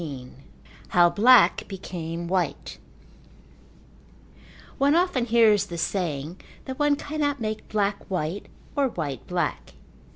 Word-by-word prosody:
XV 135 Hz, -6 st, -7 dB, 0.6 s
How 175 Hz, -1 st, +4 dB
Black 240 Hz, +2 st, +5 dB
Became 170 Hz, -3 st, -6 dB
White 175 Hz, -5 st, -2 dB, 2.0 s
One 280 Hz, +3 st, +4 dB
often 345 Hz, -8 st, +1 dB
hears 220 Hz, -4 st, +4 dB
the 170 Hz, -, -6 dB
saying 165 Hz, -2 st, -3 dB, 0.2 s
that 260 Hz, +1 st, -7 dB
one 295 Hz, -1 st, +3 dB
cannot 290 Hz, -1 st, -2 dB
make 215 Hz, -1 st, -4 dB
black 205 Hz, -1 st, -1 dB
white 180 Hz, +1 st, -3 dB, 0.3 s
or 280 Hz, -2 st, +2 dB
white 150 Hz, -, -5 dB
black. 175 Hz, -3 st, -3 dB
200 Hz, 110 wpm, -25 LUFS, 170-250 Hz, 2.0 s, Black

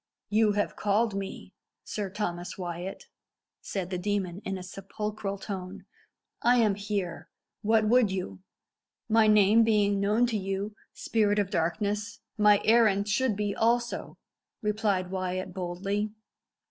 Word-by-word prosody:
"You 215 Hz, 0 st, +4 dB
have 205 Hz, 0 st, -1 dB
called 210 Hz, +2 st, +1 dB
me, 195 Hz, 0 st, -6 dB, 0.3 s
Sir 205 Hz, -2 st, -4 dB
Thomas 175 Hz, -3 st, -4 dB
Wyat," 175 Hz, +1 st, -5 dB, 0.6 s
said 190 Hz, -2 st, -4 dB
the 180 Hz, -, -2 dB
demon, 195 Hz, -1 st, -2 dB
in 195 Hz, 0 st, -3 dB
a 185 Hz, -, -7 dB
sepulchral 200 Hz, +1 st, -5 dB
tone. 190 Hz, -2 st, -7 dB, 0.6 s
"I 245 Hz, +1 st, +5 dB
am 220 Hz, -4 st, +4 dB
here. 200 Hz, -4 st, -4 dB, 0.3 s
What 220 Hz, 0 st, +3 dB
would 240 Hz, -1 st, +4 dB
you?" 180 Hz, -, -4 dB, 0.7 s
"My 220 Hz, 0 st, +4 dB
name 210 Hz, +1 st, +6 dB
being 205 Hz, -2 st, +2 dB
known 210 Hz, +4 st, +3 dB
to 235 Hz, -3 st, -1 dB
you, 195 Hz, +2 st, -3 dB, 0.2 s
spirit 210 Hz, -2 st, +1 dB
of 200 Hz, -2 st, 0 dB
darkness, 205 Hz, +5 st, -1 dB, 0.2 s
my 210 Hz, -1 st, +5 dB
errand 215 Hz, -3 st, +4 dB
should 235 Hz, +1 st, +1 dB
be 205 Hz, 0 st, -2 dB
also," 240 Hz, +1 st, 0 dB, 0.5 s
replied 205 Hz, -3 st, 0 dB
Wyat 185 Hz, -1 st, -3 dB
boldly. 195 Hz, +4 st, -2 dB
205 Hz, 135 wpm, -28 LUFS, 190-215 Hz, 0.7 s, name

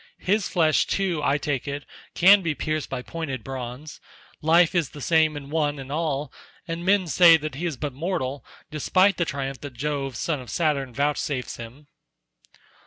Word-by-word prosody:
His 205 Hz, +1 st, +1 dB
flesh 160 Hz, -3 st, +2 dB
too, 185 Hz, -6 st, 0 dB
I 140 Hz, 0 st, +2 dB
take 145 Hz, -4 st, -3 dB
it, 140 Hz, +1 st, -4 dB, 0.3 s
can 195 Hz, +3 st, +7 dB
be 160 Hz, -4 st, -1 dB
pierced 155 Hz, 0 st, -2 dB
by 125 Hz, -, -4 dB
pointed 135 Hz, -8 st, -5 dB
bronze. 130 Hz, +3 st, -7 dB, 0.4 s
Life 165 Hz, +2 st, +4 dB
is 170 Hz, -7 st, +1 dB
the 145 Hz, -, -11 dB
same 155 Hz, +2 st, +2 dB
in 140 Hz, 0 st, -9 dB
one 150 Hz, -2 st, 0 dB
and 135 Hz, 0 st, -8 dB
all, 150 Hz, -3 st, -2 dB, 0.3 s
and 165 Hz, 0 st, -4 dB
men 195 Hz, 0 st, +3 dB
say 170 Hz, 0 st, +7 dB
that 155 Hz, -2 st, -5 dB
he 165 Hz, +7 st, -3 dB
is 155 Hz, -6 st, -4 dB
but 145 Hz, -1 st, -4 dB
mortal 140 Hz, -4 st, -3 dB, 0.3 s
despite 185 Hz, +6 st, +2 dB
the 170 Hz, -, +1 dB
triumph 135 Hz, -3 st, -4 dB
that 145 Hz, -3 st, -7 dB
Jove 135 Hz, 0 st, -3 dB
son 155 Hz, +1 st, -1 dB
of 125 Hz, -, -11 dB
Saturn 145 Hz, -6 st, 0 dB
vouchsafes 140 Hz, 0 st, -2 dB
him." 120 Hz, +6 st, -10 dB
150 Hz, 175 wpm, -24 LUFS, 135-165 Hz, 0.4 s, can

